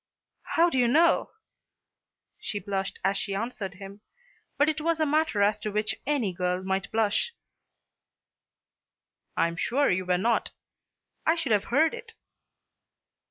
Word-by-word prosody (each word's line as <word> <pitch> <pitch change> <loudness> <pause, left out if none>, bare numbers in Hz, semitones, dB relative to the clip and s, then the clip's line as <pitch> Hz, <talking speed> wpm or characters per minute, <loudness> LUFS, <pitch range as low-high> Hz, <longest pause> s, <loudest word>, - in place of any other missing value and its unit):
"How 340 +1 +4
do 265 - +1
you 245 - +4
know?" 325 +8 +4 1.1
She 205 - -4
blushed 195 0 -3
as 195 +1 +1
she 195 - -3
answered 205 -3 -4
him, 200 +2 -11 0.6
but 290 +2 +4
it 310 0 0
was 330 +1 0
a 315 - +3
matter 300 -8 +2
as 205 +1 +2
to 215 - -3
which 210 +1 0
any 260 -11 0
girl 180 +1 -1
might 190 +1 -2
blush. 225 - +1 2.0
"I - - +3
am 170 0 -6
sure 275 +10 +2
you 185 +1 0
were 180 0 +3
not. 225 +5 0 0.7
I 325 - +3
should 325 -7 -2
have 205 -1 +3
heard 310 +6 +3
it." 475 -2 -9
215 Hz, 150 wpm, -27 LUFS, 195-300 Hz, 2.0 s, How